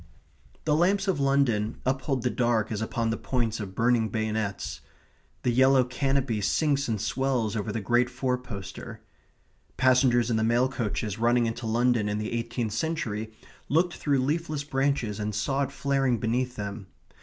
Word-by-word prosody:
The 150 -1 +3
lamps 195 +5 +2
of 185 -6 +1
London 135 -6 +1
uphold 130 -1 0
the 125 - +1
dark 120 -3 +1
as 110 -1 -2
upon 115 0 -1
the 115 - -1
points 115 -3 -1
of 95 -3 -6
burning 115 -1 +2
bayonets. 110 -2 -2 0.6
The 125 - +2
yellow 130 +1 +5
canopy 130 -3 0
sinks 140 +6 +1
and 110 -3 -1
swells 120 -1 0
over 105 0 -2
the 110 +1 -3
great 120 +4 +2
four 125 0 -1
poster. 100 -6 -8 0.8
Passengers 125 -2 +4
in 110 - +2
the 110 - +1
mail 120 +3 +3
coaches 110 -3 -3
running 120 +1 +3
into 115 +1 -3
London 115 -1 +2
in 105 - -1
the 105 +1 -3
eighteenth 115 -1 -2
century 110 -6 -2 0.4
looked 175 +5 +2
through 140 -3 0
leafless 155 0 -1
branches 135 -6 -1
and 105 0 -2
saw 135 +6 0
it 140 -1 -1
flaring 135 -3 +1
beneath 125 +3 -1
them. 100 -1 -6
120 Hz, 165 wpm, -27 LUFS, 110-135 Hz, 0.8 s, yellow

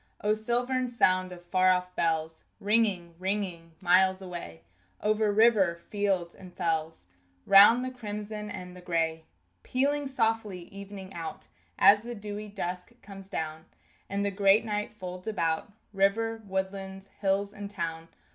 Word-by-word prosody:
O 210 +1 +2
silvern 245 +4 0
sound 185 -6 +3
of 175 -1 -10
far 185 +1 +3
off 180 0 +1
bells 160 -1 -1
Ringing, 200 -5 +2
ringing 185 -4 -2
miles 185 +1 +4
away 175 - -8 0.4
Over 215 0 +1
river, 205 -5 +4
fields, 185 -1 -2
and 185 -2 -13
fells, 160 - -2 0.4
Round 215 +6 +8
the 255 - -4
crimson 210 -3 -6
and 180 -2 -8
the 180 - -11
gray; 165 -2 -1 0.4
Pealing 285 +2 0
softly 225 -7 -1
evening 200 -1 -9
out 165 -2 -7 0.3
As 205 +2 +7
the 240 +1 -6
dewy 210 0 -6
dusk 190 +2 -6
comes 195 -1 -11
down, 160 -3 -4 0.4
And 200 +1 -1
the 200 - +1
great 200 +2 +4
night 210 -1 -2
folds 185 -2 -8
about 165 -3 -1 0.2
River, 225 +3 +1
woodlands, 190 0 -4
hills, 200 0 0
and 205 -1 -7
town! 165 -4 -4
195 Hz, 140 wpm, -28 LUFS, 180-210 Hz, 0.4 s, Round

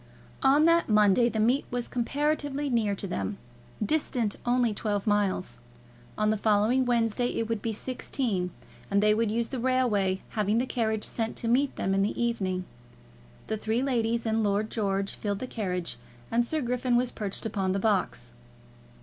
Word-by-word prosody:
On 285 +3 +5
that 335 -3 +4
Monday 210 +2 +5
the 220 - -3
meet 245 +6 +2
was 245 -1 -2
comparatively 290 +2 -1
near 215 -4 +1
to 200 - -6
them, 100 - -3 0.5
distant 245 -5 0
only 245 -2 +2
twelve 205 -1 -2
miles. 205 -3 0 0.6
On 215 0 +2
the 215 - +1
following 215 +5 +3
Wednesday 235 0 +1
it 225 - -1
would 225 -2 -2
be 225 - -1
sixteen, 220 -4 -2 0.4
and 200 +1 +2
they 210 0 +5
would 225 0 +1
use 230 +2 -1
the 260 - -4
railway, 230 -7 +1
having 210 0 0
the 245 - +2
carriage 220 -4 -1
sent 225 -1 -2
to 230 - -3
meet 265 +4 +2
them 190 - -1
in 195 - +2
the 200 - -1
evening. 190 -6 -1 0.8
The 220 - -2
three 220 +4 -1
ladies 235 -3 0
and 220 0 +1
Lord 205 +1 0
George 200 -2 -1
filled 205 -2 -3
the 255 - -4
carriage, 180 - -3 0.3
and 235 +1 +3
Sir 315 +3 -1
Griffin 250 0 0
was 245 0 +2
perched 205 -1 -4
upon 195 -4 -1
the 195 - 0
box. 195 - 0
225 Hz, 175 wpm, -28 LUFS, 205-245 Hz, 0.8 s, On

